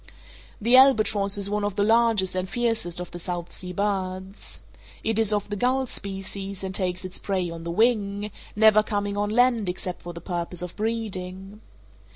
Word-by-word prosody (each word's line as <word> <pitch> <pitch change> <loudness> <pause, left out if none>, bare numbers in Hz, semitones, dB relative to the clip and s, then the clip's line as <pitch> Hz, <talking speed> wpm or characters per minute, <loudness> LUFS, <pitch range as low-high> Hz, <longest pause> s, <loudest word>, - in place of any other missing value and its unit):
The 235 +4 +4
albatross 215 -6 +5
is 200 -1 +4
one 210 0 -1
of 205 -2 -1
the 205 - +2
largest 225 -3 +3
and 185 0 -2
fiercest 225 -8 0
of 180 - -6
the 175 - -7
South 175 -1 -4
Sea 180 -1 -5
birds. 190 0 -3 0.4
It 225 0 +1
is 220 -2 +3
of 205 -1 0
the - - -1
gull 255 +5 +1
species, 195 -2 -6
and 190 0 -4
takes 185 -1 -1
its 185 +1 -5
prey 185 -3 -1
on 165 0 -7
the 170 - -5
wing, 205 0 +1 0.2
never 215 0 +6
coming 205 -1 -2
on 205 0 0
land 235 -3 +3
except 180 0 -4
for 175 - -7
the 170 - -8
purpose 175 0 -3
of 180 - -7
breeding. 205 -2 -3
200 Hz, 185 wpm, -25 LUFS, 185-215 Hz, 0.4 s, never